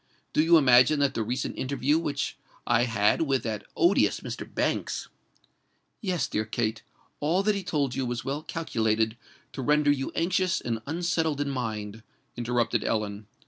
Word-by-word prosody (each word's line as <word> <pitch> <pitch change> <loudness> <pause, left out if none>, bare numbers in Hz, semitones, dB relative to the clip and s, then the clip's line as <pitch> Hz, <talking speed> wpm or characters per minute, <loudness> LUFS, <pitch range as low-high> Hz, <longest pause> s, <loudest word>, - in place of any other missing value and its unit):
do - - +4
you 165 +1 +6
imagine 130 +1 +5
that 140 -1 +2
the 115 - -2
recent 125 +4 -2
interview 140 +3 +1
which 145 -4 -2 0.3
I 120 0 +3
had 105 0 +2
with 135 -6 +1
that 110 -2 -3
odious 345 - +3
Mr. - - -6
Banks——" - - -1 0.9
"Yes, 180 - 0
dear 105 - -1
Kate: 110 0 -2 0.4
all 170 +6 +1
that 210 +1 +3
he 200 -1 -3
told 145 -7 -1
you 130 -1 -2
was 120 -1 -3
well 140 +3 -2
calculated 110 -9 0 0.4
to 135 - -5
render 150 +2 +3
you 135 -2 -1
anxious 185 +2 +1
and 115 -2 -3
unsettled 160 -2 0
in 145 -1 -1
mind," 110 -4 -4 0.3
interrupted 120 -1 0
Ellen. 105 -1 -2
135 Hz, 160 wpm, -27 LUFS, 115-155 Hz, 0.9 s, you